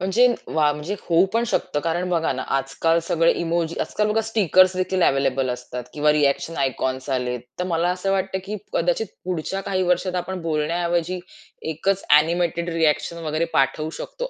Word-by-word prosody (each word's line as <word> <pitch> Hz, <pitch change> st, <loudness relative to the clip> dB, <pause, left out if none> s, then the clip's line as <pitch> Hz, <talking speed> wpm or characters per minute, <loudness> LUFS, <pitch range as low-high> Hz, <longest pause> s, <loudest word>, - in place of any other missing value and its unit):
म्हणजे 195 Hz, +7 st, +3 dB, 0.3 s
वाह! 150 Hz, -2 st, +3 dB
म्हणजे 150 Hz, +6 st, -4 dB
होऊ 170 Hz, +2 st, +3 dB
पण 230 Hz, +1 st, +2 dB
शकतं 180 Hz, -7 st, -1 dB
कारण 170 Hz, +4 st, -1 dB
बघा 165 Hz, -2 st, +1 dB
ना, -, -, -4 dB
आजकाल 135 Hz, +5 st, +1 dB
सगळे 165 Hz, 0 st, +2 dB
इमोजी, 170 Hz, -1 st, -1 dB
आजकाल 210 Hz, 0 st, 0 dB
बघा 215 Hz, +1 st, +1 dB
स्टिकर्स 185 Hz, -4 st, +3 dB
देखील 185 Hz, 0 st, 0 dB
अवेलेबल 135 Hz, -1 st, +2 dB
असतात 125 Hz, 0 st, -5 dB
किंवा 150 Hz, 0 st, +3 dB
रिएक्शन 150 Hz, +2 st, +1 dB
आयकॉन्स 130 Hz, 0 st, -1 dB
आलेत. 125 Hz, -2 st, -1 dB, 0.2 s
तर -, -, +1 dB
मला 170 Hz, 0 st, +1 dB
असं 185 Hz, +2 st, -1 dB
वाटतं, 190 Hz, 0 st, 0 dB
की 210 Hz, +2 st, -4 dB, 0.2 s
कदाचित 175 Hz, +6 st, +1 dB, 0.2 s
पुढच्या 185 Hz, +2 st, -2 dB
काही 190 Hz, -1 st, -1 dB
वर्षात 180 Hz, +1 st, +1 dB
आपण 180 Hz, +1 st, -3 dB
बोलण्याऐवजी 170 Hz, +3 st, -1 dB, 0.5 s
1च 190 Hz, +5 st, -1 dB, 0.2 s
एनिमेटेड 170 Hz, +1 st, -1 dB
रिएक्शन 160 Hz, 0 st, +1 dB
वगैरे 155 Hz, +2 st, 0 dB
पाठवू 135 Hz, +3 st, +1 dB
शकतो, -, -, -5 dB
170 Hz, 165 wpm, -23 LUFS, 150-185 Hz, 0.5 s, म्हणजे